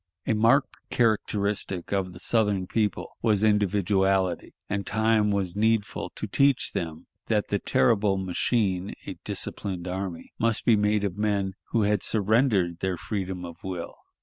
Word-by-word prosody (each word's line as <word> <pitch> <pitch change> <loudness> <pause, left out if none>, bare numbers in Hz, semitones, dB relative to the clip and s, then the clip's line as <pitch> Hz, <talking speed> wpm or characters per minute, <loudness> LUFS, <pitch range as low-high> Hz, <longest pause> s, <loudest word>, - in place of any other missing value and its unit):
A - - +1
marked 115 +6 +3
characteristic 100 -5 0
of 95 -2 0
the 85 - -11
Southern 105 -2 +1
people 105 +1 -1
was 110 -3 +2
individuality, 95 -3 +1
and 100 0 -2
time 110 -1 +2
was 100 -3 -1
needful 110 -1 0
to - - -4
teach 140 -2 +2
them 80 -2 -4 0.2
that 105 -2 0
the 100 - 0
terrible 100 -3 +2
machine, 95 +1 0
a - - -7
disciplined 90 -3 -4
army, 90 -2 -5
must 115 -1 +1
be 115 - +6
made 105 0 +1
of 100 0 -3
men 100 -2 0
who 115 - +1
had 105 -1 +2
surrendered 105 -5 +2
their 95 -2 -1
freedom 95 -2 -4
of 85 -1 -9
will. 90 -3 -5
100 Hz, 150 wpm, -26 LUFS, 95-110 Hz, 0.2 s, be